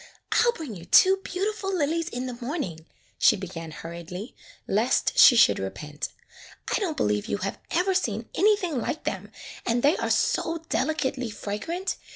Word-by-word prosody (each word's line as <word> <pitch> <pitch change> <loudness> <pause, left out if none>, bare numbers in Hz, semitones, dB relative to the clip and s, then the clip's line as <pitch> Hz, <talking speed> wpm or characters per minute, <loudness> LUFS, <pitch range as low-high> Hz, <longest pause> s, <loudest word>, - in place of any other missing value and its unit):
"I - - +4
'll 475 - +4
bring 310 - -7
you 170 -2 -10
two 380 - +6
beautiful 390 +2 -2
lilies 330 +2 0
in 250 -3 -4
the 250 - -4
morning," 215 - -4 0.3
she - - +6
began 175 -4 -7
hurriedly, 170 - -8 0.3
lest - - +1
she 245 - +9
should 100 - +5
repent. 125 +11 -5 0.7
"I - - +1
don't 360 -7 -2
believe 105 0 0
you - - -1
have 195 - -4
ever 370 +3 +1
seen 225 - -1
anything 385 - +2
like 300 +6 -3
them, - - -4 0.3
and 240 +1 0
they 290 +4 +5
are - - -2
so 330 +1 +1
delicately 265 -4 -1
fragrant. 225 - -4
255 Hz, 165 wpm, -26 LUFS, -, 0.7 s, she